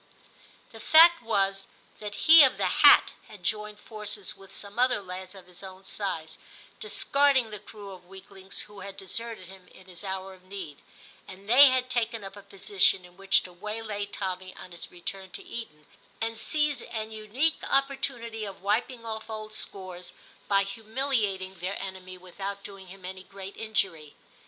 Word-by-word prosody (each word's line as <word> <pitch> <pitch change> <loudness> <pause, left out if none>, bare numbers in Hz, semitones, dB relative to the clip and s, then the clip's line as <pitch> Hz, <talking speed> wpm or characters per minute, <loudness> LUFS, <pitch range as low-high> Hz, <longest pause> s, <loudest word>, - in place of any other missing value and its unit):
The 225 - -11
fact 335 +6 +7
was 195 -4 0 0.3
that 210 -1 -6
he 320 -1 +11
of 265 - +4
the - - +1 0.2
hat - - +9 0.2
had 205 -4 -13
joined 210 +2 -2
forces 210 -3 -4
with 195 0 -16
some 205 +3 -6
other 250 -2 +4
lads 185 0 -8
of 190 -2 -12
his 180 -1 -12
own 190 0 -10
size, 165 -6 -3 0.4
discarding 280 - +3
the 210 - -6
crew 205 -1 -11
of 180 -2 -12
weaklings 190 0 -8
who 205 -1 -12
had 200 0 -8
deserted 215 0 -5
him 190 0 -13
in 185 - -17
his 185 0 -11
hour 190 0 -4
of 185 -1 -18
need, 185 -6 -8 0.5
and 195 +1 -12
they 265 +6 +9
had 255 -1 +2
taken 230 -3 -1
up 195 0 -8
a 205 - -10
position 195 -1 +2
in 180 0 -17
which 195 +1 +3
to 180 - -10
waylay 210 +2 -4
Tommy 185 -2 -4
on 180 - -11
his 170 - -7
return 190 +2 -7
to - - -7
Eton, 155 -11 -8 0.3
and 225 0 -2
seize 295 +1 0
an 220 -1 -5
unique 220 +9 +1
opportunity 265 -5 0
of 195 -2 -8
wiping 230 +4 0
off 220 0 -5
old 215 -1 -6
scores 185 -4 -5 0.3
by 200 -1 +4
humiliating 210 -3 -1
their 185 +3 -3
enemy 185 -1 -7
without 195 +2 -6
doing 195 -2 -9
him 185 0 -11
any 185 0 -6
great 195 +1 -10
injury. 190 -9 -1
200 Hz, 170 wpm, -28 LUFS, 190-225 Hz, 0.5 s, he